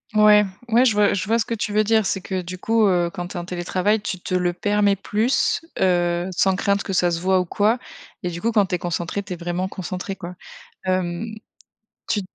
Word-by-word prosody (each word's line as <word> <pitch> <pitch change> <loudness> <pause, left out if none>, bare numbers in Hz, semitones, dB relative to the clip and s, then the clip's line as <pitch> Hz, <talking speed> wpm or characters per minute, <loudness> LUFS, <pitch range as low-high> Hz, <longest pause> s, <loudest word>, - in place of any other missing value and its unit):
Ouais, 210 0 +6 0.2
ouais, 235 +3 +5
je 225 - +4
vois 205 0 +3
je 195 -1 -2
vois 230 +2 +3
ce 220 - 0
que - - -3
tu 215 -2 -3
veux 215 +1 +4
dire 220 0 +2
c'est 190 0 -1
que 190 0 -3
du 180 +1 -7
coup, 225 +2 +2
heu, 175 -2 +2
quand 175 -2 -5
tu - - -10
es - - -2
en 175 - -5
télétravail 185 +4 0
tu 185 -3 -4
te 185 - -5
le 180 -1 +1
permets 205 +2 +2
plus, 215 +6 +1 0.2
heu, 175 -1 +2
sans 190 +1 +2
crainte 200 +1 +1
que 195 - -4
ça 175 -1 +2
se 165 - -1
voit 185 +1 +2
ou - - -3
quoi 210 +6 +2 0.5
et 180 - -1
du 170 -1 -6
coup 230 +1 0
quand 205 -3 +3
tu 180 - -1
es - - -1
concentrée 175 +3 -2
tu 195 -2 -6
es - - -4
vraiment 175 +2 -3
concentrée 190 0 -5
quoi. 180 -1 -8 0.5
Hem, 185 0 -1 0.8
tu 210 - +1
190 Hz, 240 wpm, -22 LUFS, 175-210 Hz, 0.8 s, Ouais